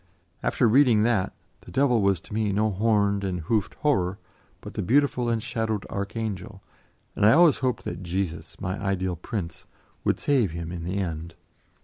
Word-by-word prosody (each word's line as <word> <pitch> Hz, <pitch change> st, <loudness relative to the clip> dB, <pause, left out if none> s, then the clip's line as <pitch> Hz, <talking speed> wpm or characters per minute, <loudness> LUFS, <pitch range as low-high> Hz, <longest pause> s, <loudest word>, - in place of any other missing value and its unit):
After -, -, +2 dB
reading 120 Hz, -2 st, +5 dB
that, 110 Hz, -5 st, +1 dB, 0.3 s
the -, -, -15 dB
devil 130 Hz, -4 st, +2 dB
was 100 Hz, -3 st, +2 dB
to -, -, -12 dB
me 105 Hz, -1 st, 0 dB
no 105 Hz, +2 st, +1 dB
horned 100 Hz, -1 st, +2 dB
and 90 Hz, -2 st, -2 dB
hoofed 105 Hz, +5 st, -1 dB
horror, 95 Hz, -11 st, +1 dB, 0.4 s
but -, -, -10 dB
the -, -, -2 dB
beautiful 125 Hz, +1 st, +2 dB
shadowed 110 Hz, -2 st, -2 dB
archangel, 100 Hz, -1 st, -4 dB, 0.5 s
and -, -, -1 dB
I 105 Hz, -, +7 dB
always 165 Hz, -1 st, +6 dB
hoped 130 Hz, -2 st, -1 dB
that 85 Hz, +1 st, -5 dB
Jesus, 90 Hz, -1 st, -4 dB
my 95 Hz, +2 st, -3 dB
ideal 95 Hz, -2 st, -1 dB
Prince, 85 Hz, -1 st, -6 dB, 0.4 s
would -, -, +1 dB
save 125 Hz, -, +2 dB
him 85 Hz, 0 st, -5 dB
in 85 Hz, -2 st, -5 dB
the 90 Hz, +3 st, -2 dB
end. 85 Hz, -3 st, -4 dB
100 Hz, 165 wpm, -26 LUFS, 90-115 Hz, 0.5 s, I